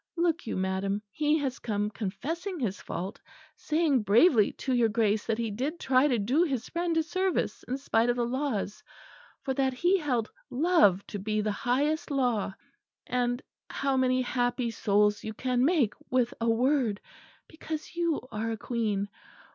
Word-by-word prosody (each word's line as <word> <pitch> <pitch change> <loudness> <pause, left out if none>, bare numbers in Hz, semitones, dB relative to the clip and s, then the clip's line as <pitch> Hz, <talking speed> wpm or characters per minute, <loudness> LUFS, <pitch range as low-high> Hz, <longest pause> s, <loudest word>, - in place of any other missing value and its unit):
Look 335 -5 +1
you, - - -2
madam, 190 +2 -1
he 300 0 +2
has 270 -4 -2
come 210 -2 -2
confessing 320 - -4
his 205 -7 -2
fault; 185 +4 -5 0.3
saying 305 -5 +1
bravely 215 - +5
to 260 - -3
your 240 -2 +3
Grace 215 -1 +1
that 225 -1 0
he 230 -2 -2
did 275 +11 -3
try 260 +2 +3
to 250 -5 +2
do 245 +10 +2
his 270 -9 0
friend 340 -1 -1
a 320 - +3
service 370 +3 -1
in 260 - -2
spite 240 -4 +1
of 240 - +2
the 240 -1 0
laws, 245 -5 -2 0.6
for 265 - -1
that 265 0 +1
he 360 +7 +3
held 250 -8 0 0.2
love 275 - +3
to 205 - -6
be 215 +2 -1
the 210 0 0
highest 285 - 0
law. 245 -8 0 0.6
Ah! 245 -1 +1 0.3
how 275 -1 0
many 255 0 +2
happy 245 -1 0
souls 210 -1 +2
you 220 0 -5
can 250 +1 0
make 285 - +3 0.2
with 250 -2 +1
a 230 - +2
word; 240 -2 +2 0.5
because 315 0 -7
you 340 -3 0
are 220 +1 -2
a 225 - -2
Queen. 215 -4 -1
245 Hz, 170 wpm, -28 LUFS, 215-295 Hz, 0.6 s, bravely